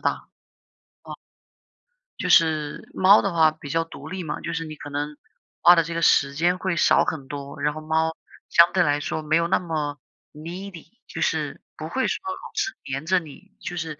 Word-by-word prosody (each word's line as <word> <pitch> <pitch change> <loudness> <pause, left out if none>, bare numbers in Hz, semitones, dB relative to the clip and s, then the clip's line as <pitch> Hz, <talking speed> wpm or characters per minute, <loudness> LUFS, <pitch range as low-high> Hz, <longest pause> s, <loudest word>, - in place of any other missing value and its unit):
大。 - - +1 0.9
哦。 - - -8 1.0
就 - - -2
是， 155 -3 +2
猫 195 +3 +6
的 200 - -1
话 160 -2 +5
比 155 -2 -11
较 165 +3 0
独 165 - -11
立 185 0 -5
嘛。 150 -2 -4
就 170 - -4
是 165 0 -3
你 155 -1 -8
可 145 - -9
能， 145 +1 -4 0.5
花 175 +1 +9
的 165 - +4
这 165 +1 -6
个 165 - -2
时 140 0 +4
间 175 +4 +1
会 190 -2 -1
少 - - +4
很 145 -4 -4
多， 140 0 -7
然 150 +1 0
后 155 - -6
猫 160 +1 0 0.3
相 170 0 +6
对 185 - +3
来 145 -3 +1
说 155 +1 -3
没 155 +1 +1
有 170 0 +2
那 - - +3
么 150 -4 -3 0.3
Needy， 170 +3 -8 0.2
就 - - -6
是 - - -1 0.2
不 - - -6
会 - - 0
说 - - -2
老 375 - -5 0.2
是 400 -3 -1 0.2
粘 140 +3 -3
着 185 +1 +3
你， 180 +5 -12
就 175 - -6
是 165 -1 -3
要 - - -5
这 - - -39
160 Hz, 245 characters per minute, -24 LUFS, 150-175 Hz, 1.0 s, 花